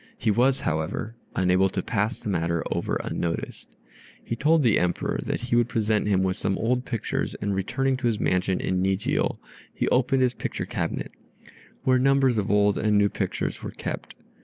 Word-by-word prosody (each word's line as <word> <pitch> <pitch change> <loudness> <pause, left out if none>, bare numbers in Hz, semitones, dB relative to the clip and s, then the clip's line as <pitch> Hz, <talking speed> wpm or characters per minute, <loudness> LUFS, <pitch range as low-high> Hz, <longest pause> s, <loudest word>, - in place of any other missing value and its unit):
He 110 - +1
was, 130 +5 +3
however, 80 +8 -2 0.2
unable 95 +1 +3
to 95 0 -3
pass 110 +1 -1
the - - -5
matter 85 -3 0
over - - -1
unnoticed. 85 -1 -4 0.5
He 115 - -3
told 155 +5 +3
the 115 -4 +4
Emperor 90 0 -1
that - - -2
he 120 0 -1
would 120 0 +3
present 110 -1 +1
him 95 -2 +2
with 95 -1 0
some 95 - -1
old 125 +2 0
pictures, 115 - -2
and 100 0 -2
returning 130 +8 0
to 130 -2 -1
his 110 -3 0
mansion 90 0 +1
at - - 0
Nijio 95 +2 0 0.3
he - - -2
opened 130 +1 +3
his 125 -1 +2
picture - - -4
cabinet, - - -3 0.7
where 130 -1 +4
numbers 135 -3 +3
of 105 - -2
old 105 0 +3
and 105 0 +2
new 100 0 +4
pictures - - -3
were - - -5
kept. - - -6
105 Hz, 185 wpm, -25 LUFS, 95-125 Hz, 0.7 s, the